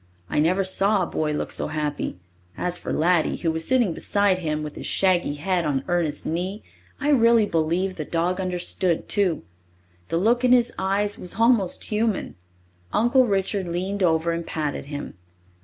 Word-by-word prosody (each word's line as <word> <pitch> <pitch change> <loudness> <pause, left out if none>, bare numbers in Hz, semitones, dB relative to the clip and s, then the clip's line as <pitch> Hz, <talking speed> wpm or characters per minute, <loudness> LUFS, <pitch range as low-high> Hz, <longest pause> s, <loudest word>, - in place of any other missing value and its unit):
I - - +1
never 180 +6 +2
saw 195 +1 +3
a - - 0
boy 155 -2 -2
look - - -3
so - - -2
happy. 150 - -3 0.4
As 180 0 -1
for - - -5
Laddie, 170 +1 +2
who 165 - -1
was 160 0 -2
sitting 245 -9 +2
beside 200 0 +1
him 155 -3 -2
with 150 -1 -7
his - - -6
shaggy 180 -6 +2
head 175 +4 0
on 140 -4 -1
Ernest's 165 -4 -1
knee, 185 +6 -3 0.4
I 290 - -1
really 230 -5 +5
believe 170 +2 -1
the 155 - -3
dog 170 +4 -1
understood, 180 -1 0
too. 190 -6 0 0.7
The 165 - 0
look 235 +7 +2
in 250 0 +5
his 245 -1 +3
eyes 200 +2 0
was 180 - -2
almost 225 -5 +2
human. 215 -1 -1 0.6
Uncle 245 +3 +3
Richard 195 -1 -1
leaned 185 +4 -3
over 165 -1 +2
and 170 0 -3
patted 150 -4 -4
him. 145 -10 -7
180 Hz, 175 wpm, -24 LUFS, 160-205 Hz, 0.7 s, really